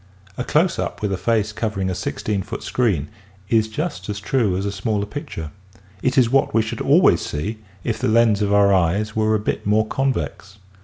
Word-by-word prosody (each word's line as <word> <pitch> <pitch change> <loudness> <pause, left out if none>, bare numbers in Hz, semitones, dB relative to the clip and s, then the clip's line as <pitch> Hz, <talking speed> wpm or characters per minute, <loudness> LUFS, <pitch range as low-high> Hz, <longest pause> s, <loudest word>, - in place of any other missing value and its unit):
A 125 - -3
close 170 +6 +1
up - - -4
with 100 -2 0
a - - +1
face 110 +1 0
covering 105 -3 -2
a 95 - -1
sixteen 100 +2 -2
foot 95 - -6
screen 95 - 0 0.4
is 110 -2 +3
just 150 +4 -4
as 105 -1 -3
true 105 -3 +1
as 95 - -2
a 100 - -1
smaller 100 +1 -1
picture. 90 - -6 0.5
It 130 0 0
is 120 -3 +4
what 135 -4 +2
we 115 - +4
should 110 - -5
always - - +4
see 105 +10 -4 0.2
if 115 -2 -2
the - - 0
lens 110 -1 +4
of 100 -1 +1
our 100 -1 +5
eyes 95 +4 +1
were 110 0 +2
a - - +1
bit 105 - -2
more 110 +1 +3
convex. 110 -6 -2
105 Hz, 205 wpm, -21 LUFS, 100-115 Hz, 0.5 s, our